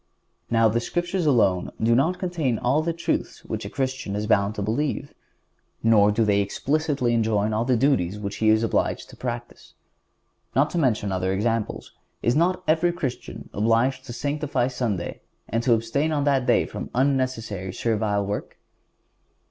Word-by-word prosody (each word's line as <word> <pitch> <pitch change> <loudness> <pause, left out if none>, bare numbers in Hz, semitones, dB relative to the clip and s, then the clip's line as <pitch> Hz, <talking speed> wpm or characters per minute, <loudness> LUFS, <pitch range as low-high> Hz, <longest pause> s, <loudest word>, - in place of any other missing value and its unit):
Now 115 -1 +4
the 110 +2 +1
Scriptures 175 +6 -1
alone 100 -10 +3
do 115 +1 +3
not 160 +9 +2
contain 170 - -1
all 130 +7 +1
the 170 +2 -1
truths 170 +1 -3
which - - -4
a - - -5
Christian 130 -6 -3
is 105 +1 -2
bound 105 -1 +2
to 105 - -3
believe, 140 +6 -2 0.7
nor 105 -2 +5
do 110 +2 +2
they 100 -1 +3
explicitly 140 - 0
enjoin 110 -2 +1
all 110 +2 0
the 125 -1 +2
duties 105 -8 +1
which 100 0 -5
he 110 - +2
is 110 +1 +4
obliged 115 - -1
to - - -12
practice. 120 -1 -6 0.8
Not 140 +3 +3
to 175 - 0
mention 110 -8 +1
other 95 0 0
examples, 110 +3 -1 0.3
is 120 - +2
not 180 +3 +2
every 165 +2 +3
Christian 150 -8 -5
obliged 115 +5 +1
to 130 - -7
sanctify 140 -1 -1
Sunday 110 -9 -3 0.3
and 115 +2 -1
to 120 0 +4
abstain 115 +8 -1
on 145 -2 0
that 135 -3 +2
day - - +4
from - - -6
unnecessary 125 -8 0
servile 105 -1 0
work? 100 +1 -4
120 Hz, 165 wpm, -24 LUFS, 105-140 Hz, 0.8 s, nor